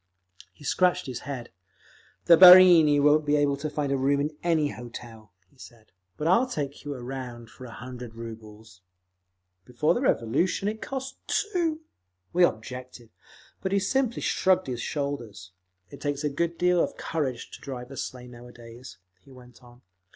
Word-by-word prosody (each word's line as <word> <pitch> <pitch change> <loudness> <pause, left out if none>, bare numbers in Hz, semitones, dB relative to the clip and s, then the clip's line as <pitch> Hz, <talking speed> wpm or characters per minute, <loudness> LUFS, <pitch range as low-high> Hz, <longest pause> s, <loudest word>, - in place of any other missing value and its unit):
He - - -19
scratched 180 +3 +1
his 125 -2 -5
head. 125 -4 -6 0.7
"The 170 - +8
barini 180 -4 +8
won't 150 +2 +4
be 145 0 +1
able 145 -1 +2
to 155 +2 -4
find 145 -2 -3
a 140 - +1
room 140 +2 +1
in 150 +2 -2
any 160 -4 +1
hotel," 115 -4 -10 0.2
he 135 - -29
said. 115 -4 -15 0.3
"But 150 - -4
I'll 230 +9 +4
take 145 - -5
you 145 -1 -5
around 120 -2 -8
for 130 - -12
a 120 - -10
hundred 125 -1 -9
rubles…." 110 -3 -11 0.8
Before 125 +8 0
the 240 - -2
Revolution 170 - 0
it 215 +1 -4
cost 265 0 -6
two! 340 -6 -1 0.5
We 180 - +4
objected, 125 -2 -3 0.5
but 190 - -3
he 200 - +3
simply 250 +4 -1
shrugged 185 -1 +2
his 125 -2 -4
shoulders. 120 - -5 0.4
"It - - -12
takes 145 0 -3
a 150 - +1
good 170 +4 -2
deal 180 -1 +3
of - - -5
courage 135 -7 -4
to - - -11
drive 125 -1 -8
a - - -8
sleigh 125 -1 -6
nowadays," 120 -3 -13 0.2
he 135 - -20
went 125 -1 -16
on. 120 0 -19
140 Hz, 165 wpm, -26 LUFS, 120-170 Hz, 0.8 s, The